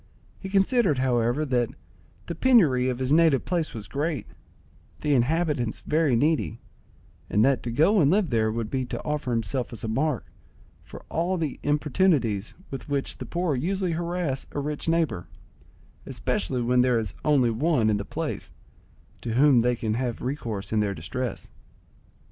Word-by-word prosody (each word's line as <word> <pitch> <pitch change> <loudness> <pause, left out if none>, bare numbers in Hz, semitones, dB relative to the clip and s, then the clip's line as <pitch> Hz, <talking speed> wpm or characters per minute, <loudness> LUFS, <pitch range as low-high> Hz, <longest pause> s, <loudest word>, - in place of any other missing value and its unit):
He 190 - -7
considered, 195 - +3
however, 125 +2 +1
that 125 -4 +1 0.6
the - - -4
penury 160 - +4
of 125 - -2
his 130 +2 0
native 160 -5 +4
place 170 -3 -1
was 110 -2 -6
great, 145 -2 -2 0.8
the 150 - +1
inhabitants 140 -2 +1
very 155 -4 +2
needy, 140 -3 +1 0.7
and 105 +3 +3
that 135 -1 +2
to 120 - -4
go 170 - +4
and 140 - +4
live 190 -1 +2
there 110 -2 +2
would 115 -1 -3
be 130 -1 0
to - - -5
offer 150 -3 -2
himself 120 +2 -1
as 115 -4 -5
a - - -2
mark 135 +3 0 0.6
for - - -12
all 175 +3 0
the 160 -4 -3
importunities 145 - +1 0.2
with 135 +1 -7
which 140 -1 -2
the - - -6
poor 175 -2 -1
usually 185 +6 -1
harass 170 -4 -2
a - - -2
rich 150 +2 -3
neighbour, 160 - 0 0.8
especially 120 +7 -2
when 125 +1 +3
there 125 -1 +3
is 110 -5 -2
only 135 -6 +3
one 125 -1 +2
in 105 -1 +2
the 100 - -3
place - - -5 0.7
to 115 -2 -3
whom 135 -2 +5
they 125 +1 +2
can 110 -2 -2
have 120 0 -2
recourse 115 -7 -4
in 110 - +2
their 100 -2 0
distress. 125 -1 -5
135 Hz, 165 wpm, -26 LUFS, 120-160 Hz, 0.8 s, whom